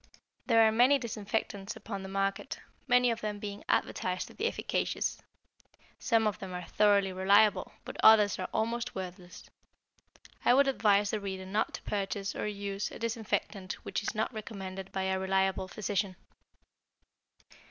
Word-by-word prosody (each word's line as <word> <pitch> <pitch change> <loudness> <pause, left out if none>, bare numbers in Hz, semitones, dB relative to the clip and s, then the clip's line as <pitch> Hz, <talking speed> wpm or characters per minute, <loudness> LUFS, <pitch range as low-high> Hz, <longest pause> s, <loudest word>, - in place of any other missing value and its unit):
There 225 -2 +6
are - - +3
many 250 +5 +5
disinfectants 210 -4 -3
upon 200 -3 -6
the 190 - -7
market, 195 +7 -2 0.3
many 250 -1 +4
of 230 0 -3
them 210 -1 -3
being 205 0 -6
advertised 185 0 0
to - - -13
be 445 - -1
efficacious. - - -1 0.8
Some 225 -3 +2
of 210 -2 0
them 185 -2 -6
are 180 - -5
thoroughly 200 -2 +3
reliable, 200 +3 +4
but - - -7
others 210 -3 +7
are 185 - -3
almost 235 +2 -1
worthless. 180 -1 -8 1.0
I 245 - +5
would 280 +1 +5
advise 205 -6 +3
the 215 - -1
reader 190 -2 -5
not 205 +3 -1
to - - -10
purchase 200 0 -3
or - - -2
use 200 -1 -3
a - - -9
disinfectant 220 -4 -2
which - - -2
is 205 - -3
not 220 +4 -1
recommended 195 -3 -7
by 190 - -2
a 190 0 0
reliable 190 0 +1
physician. 200 -1 -2
205 Hz, 155 wpm, -31 LUFS, 190-220 Hz, 1.0 s, others